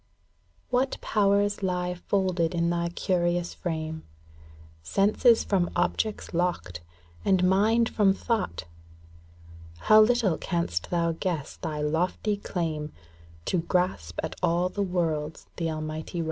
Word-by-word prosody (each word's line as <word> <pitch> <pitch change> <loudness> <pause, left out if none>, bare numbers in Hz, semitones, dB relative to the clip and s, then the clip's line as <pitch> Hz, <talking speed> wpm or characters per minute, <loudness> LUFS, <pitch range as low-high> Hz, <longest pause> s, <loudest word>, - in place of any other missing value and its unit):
What 255 +2 +1
powers 205 0 +2
lie 180 -1 -1
folded 180 -2 0
in 170 0 +1
thy 170 0 0
curious 175 0 0
frame, 160 -2 -4 0.8
ŌĆö - - -17
Senses 215 - +4
from 185 -4 +1
objects 215 -3 -1
locked, 170 - -1 0.4
and 185 -1 +3
mind 220 +5 +3
from 205 -3 +3
thought! 205 - -2 1.1
How 215 - +6
little 215 -6 +3
canst 170 - -2
thou 170 -1 +1
guess 165 -3 -3
thy 150 -1 -4
lofty 180 +7 0
claim 160 -6 -3 0.5
To 180 - +1
grasp 165 - -1
at - - -4
all 175 +2 +2
the 205 - -3
worlds 160 -5 -1
the 165 -2 -1
Almighty 155 +2 -5
wrought! - - -1
175 Hz, 125 wpm, -27 LUFS, 160-200 Hz, 1.1 s, How